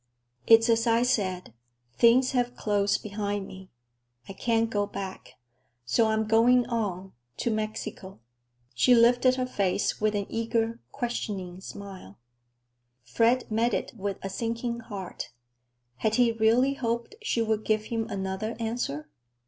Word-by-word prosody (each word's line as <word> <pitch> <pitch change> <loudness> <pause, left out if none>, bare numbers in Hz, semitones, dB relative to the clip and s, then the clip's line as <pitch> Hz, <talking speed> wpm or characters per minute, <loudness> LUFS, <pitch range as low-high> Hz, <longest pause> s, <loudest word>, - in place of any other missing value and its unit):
"It's 225 +1 +7
as 230 0 +2
I 230 +1 +4
said. 185 - -1 0.4
Things 250 +2 +5
have 245 -1 0
closed 205 -1 0
behind 205 -1 -3
me. 190 0 -11 0.6
I 195 - -7
can't 230 +3 +1
go 205 -1 0
back, 195 -2 -7 0.5
so 220 - +3
I 220 - +1
am 220 0 +1
going 235 +3 +4
on—to 190 - -4
Mexico?" 215 - -5 0.5
She 245 - +5
lifted 245 +2 +5
her 255 -1 -1
face 200 -5 -1
with 215 0 +1
an 200 -1 -1
eager, 230 0 -1
questioning 195 -7 -4
smile. 190 - -10 0.9
Fred 230 - +1
met 230 +2 +2
it - - -4
with 200 -2 -3
a 195 - -3
sinking 230 +3 -3
heart. 200 -5 -7 0.7
Had 220 0 0
he 245 -1 +4
really 230 +4 +3
hoped 235 - -3
she 235 - 0
would 220 -1 -1
give 215 -1 +1
him 225 0 -3
another 195 +3 -3
answer? 220 - -3
220 Hz, 140 wpm, -27 LUFS, 200-235 Hz, 0.9 s, It's